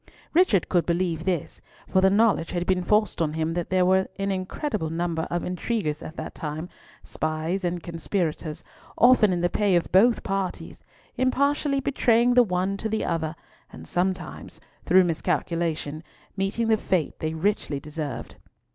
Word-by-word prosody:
Richard 320 Hz, -, +4 dB
could 175 Hz, -2 st, +1 dB
believe 170 Hz, -1 st, 0 dB
this, 180 Hz, -5 st, -2 dB, 0.3 s
for 190 Hz, -, +2 dB
the 190 Hz, -, +5 dB
knowledge 200 Hz, -4 st, +2 dB
had 175 Hz, 0 st, -1 dB
been 185 Hz, 0 st, +1 dB
forced 210 Hz, -1 st, +1 dB
on 155 Hz, -2 st, 0 dB
him 160 Hz, +1 st, -1 dB
that 175 Hz, 0 st, -3 dB
there 185 Hz, -1 st, +3 dB
were 190 Hz, +1 st, +3 dB
an 195 Hz, 0 st, -1 dB
incredible 190 Hz, -, -3 dB
number 165 Hz, 0 st, -2 dB
of 175 Hz, 0 st, -2 dB
intriguers 180 Hz, -4 st, -2 dB
at 160 Hz, -, -8 dB
that -, -, -6 dB
time, 155 Hz, +2 st, -5 dB, 0.3 s
spies 155 Hz, +4 st, -2 dB
and 175 Hz, -1 st, -2 dB
conspirators, 165 Hz, -2 st, -3 dB, 0.3 s
often 240 Hz, -4 st, +6 dB
in 175 Hz, -1 st, 0 dB
the 175 Hz, -, +3 dB
pay 200 Hz, +1 st, +1 dB
of 170 Hz, -, 0 dB
both 225 Hz, +6 st, +4 dB
parties, 195 Hz, -2 st, -4 dB, 0.3 s
impartially 275 Hz, +2 st, +1 dB
betraying 245 Hz, -3 st, +3 dB
the 250 Hz, -, +7 dB
one 190 Hz, -2 st, 0 dB
to 220 Hz, -, -3 dB
the 220 Hz, 0 st, -1 dB
other, 160 Hz, -1 st, -2 dB, 0.4 s
and -, -, -11 dB
sometimes, 185 Hz, +1 st, -3 dB, 0.3 s
through 185 Hz, 0 st, +6 dB
miscalculation, 165 Hz, -2 st, -1 dB, 0.3 s
meeting 195 Hz, +4 st, -1 dB
the 220 Hz, -, +4 dB
fate 185 Hz, -6 st, -1 dB
they 155 Hz, 0 st, -2 dB
richly 160 Hz, -5 st, -1 dB
deserved. 150 Hz, -4 st, -6 dB
180 Hz, 160 wpm, -25 LUFS, 165-205 Hz, 0.4 s, the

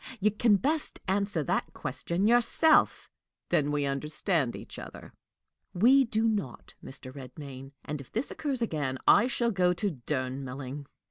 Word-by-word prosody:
You 210 Hz, +2 st, +3 dB
can 215 Hz, +1 st, +3 dB
best 295 Hz, +9 st, -1 dB
answer 195 Hz, -4 st, 0 dB
that -, -, -1 dB
question 175 Hz, +4 st, -2 dB
yourself." 240 Hz, +7 st, +4 dB, 0.4 s
"Then 145 Hz, -1 st, +2 dB
we 145 Hz, -1 st, 0 dB
understand 150 Hz, -, -1 dB
each -, -, -9 dB
other." -, -, -10 dB, 0.6 s
"We 260 Hz, +8 st, +6 dB
do 225 Hz, -1 st, +1 dB
not, 200 Hz, -, -3 dB
Mr. 130 Hz, -1 st, -9 dB
Redmain; 135 Hz, 0 st, -9 dB
and, 150 Hz, -1 st, -4 dB
if 135 Hz, -, -15 dB
this 235 Hz, +6 st, -2 dB
occurs 270 Hz, -5 st, -2 dB
again, 145 Hz, -10 st, -2 dB
I 235 Hz, -, +6 dB
shall 240 Hz, -2 st, +1 dB
go 180 Hz, -3 st, +2 dB
to 200 Hz, +2 st, -1 dB
Durnmelling." 135 Hz, 0 st, -4 dB
170 Hz, 145 wpm, -29 LUFS, 135-220 Hz, 0.6 s, We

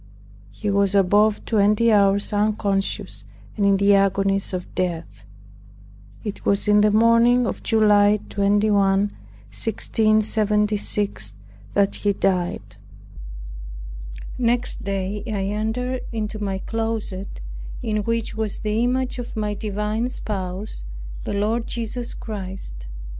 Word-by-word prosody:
He 210 Hz, -2 st, -3 dB
was 200 Hz, 0 st, +2 dB
above 205 Hz, +2 st, +3 dB
twenty 215 Hz, +1 st, +3 dB
hours 200 Hz, 0 st, +3 dB
unconscious 205 Hz, -2 st, -1 dB, 0.3 s
and 210 Hz, -, -1 dB
in 195 Hz, -1 st, +4 dB
the 200 Hz, +1 st, +4 dB
agonies 195 Hz, 0 st, +2 dB
of 180 Hz, -1 st, -3 dB
his -, -, -20 dB
death. 175 Hz, -3 st, -3 dB, 1.0 s
It 210 Hz, -3 st, -5 dB
was 200 Hz, +1 st, +1 dB
in 210 Hz, 0 st, +5 dB
the 210 Hz, -, +5 dB
morning 230 Hz, +3 st, +5 dB
of -, -, -3 dB
July 210 Hz, -2 st, +4 dB
21, 205 Hz, +1 st, +2 dB
1676, 210 Hz, -, 0 dB, 0.4 s
that 200 Hz, -1 st, +3 dB
he 205 Hz, -1 st, +1 dB
died. 185 Hz, -3 st, -1 dB, 1.6 s
Next 245 Hz, 0 st, 0 dB
day 195 Hz, +1 st, -2 dB
I 200 Hz, -3 st, -2 dB
entered 250 Hz, +4 st, -2 dB
into 215 Hz, -1 st, -3 dB
my 195 Hz, -1 st, -1 dB
closet, 220 Hz, -, -3 dB, 0.4 s
in 215 Hz, -1 st, 0 dB
which 230 Hz, +2 st, -1 dB
was 220 Hz, -2 st, -1 dB
the 215 Hz, +2 st, 0 dB
image 255 Hz, +1 st, 0 dB
of 240 Hz, -, -6 dB
my 210 Hz, -1 st, -1 dB
divine 210 Hz, +3 st, -2 dB
spouse, 190 Hz, -, -4 dB, 0.4 s
the -, -, -3 dB
Lord 220 Hz, +3 st, 0 dB
Jesus 235 Hz, +1 st, -3 dB
Christ. 190 Hz, -, -7 dB
210 Hz, 115 wpm, -23 LUFS, 195-220 Hz, 1.6 s, in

